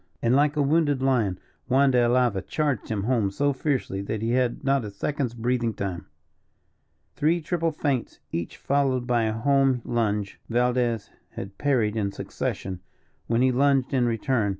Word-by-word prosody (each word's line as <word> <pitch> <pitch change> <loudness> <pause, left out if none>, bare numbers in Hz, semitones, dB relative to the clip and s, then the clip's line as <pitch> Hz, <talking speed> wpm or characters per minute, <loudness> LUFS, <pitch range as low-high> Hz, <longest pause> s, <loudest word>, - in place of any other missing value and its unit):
And, 120 +2 +2
like 145 +1 +3
a 150 - +2
wounded 145 -1 +2
lion, 115 -9 +1 0.3
Juan 135 +1 +4
de 125 - +3
Alava 120 -4 +2
charged 145 - -2
him 105 -3 -1
home 115 -4 +1
so 140 +8 0
fiercely 130 -8 -1
that 105 +2 -4
he 115 - 0
had 125 0 0
not 135 -2 +2
a 105 - -5
second's 125 +4 -3
breathing 120 -1 0
time. 95 -3 -4 1.1
Three 165 +4 +2
triple 165 +1 -1
feints, 140 -5 -2
each 85 0 -4
followed 135 -3 +1
by 120 -2 +2
a 110 - 0
home 135 +1 +2
lunge, 105 -4 -1
Valdez 120 -2 0 0.2
had 95 0 -8
parried 120 -7 +1
in 100 -3 -1
succession, 95 -1 -4 0.5
when 115 +2 +2
he 130 - +4
lunged 135 0 +2
in 125 -2 +3
return. 115 -1 0
125 Hz, 165 wpm, -25 LUFS, 110-140 Hz, 1.1 s, Juan